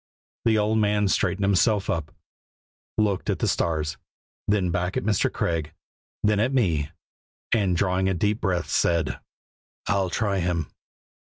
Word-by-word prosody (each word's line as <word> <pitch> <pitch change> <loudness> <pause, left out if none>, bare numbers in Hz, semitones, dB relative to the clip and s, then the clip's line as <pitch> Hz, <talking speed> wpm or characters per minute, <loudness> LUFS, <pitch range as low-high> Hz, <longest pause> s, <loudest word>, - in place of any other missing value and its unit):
The 110 -1 +4
old 110 +1 +2
man 105 -1 +2
straightened 95 +1 +1
himself 100 +1 +2
up, 80 0 -2 0.9
looked 105 -2 0
up - - +3
at - - -5
the - - 0
stars, 75 -2 0 0.5
then 100 -4 +2
back 90 +2 -1
at - - -1
Mr. 105 -2 +1
Craig, 80 -3 -2 0.5
then 105 -1 +3
at 125 +5 +1
me, 80 - +1 0.6
and 95 -6 +2
drawing 95 0 +1
a 95 - 0
deep 105 +5 0
breath 90 -4 0
said: 85 -1 +1 0.7
"I'll 95 -2 +1
try 100 0 0
Him." 85 -3 -1
95 Hz, 150 wpm, -25 LUFS, 85-105 Hz, 0.9 s, The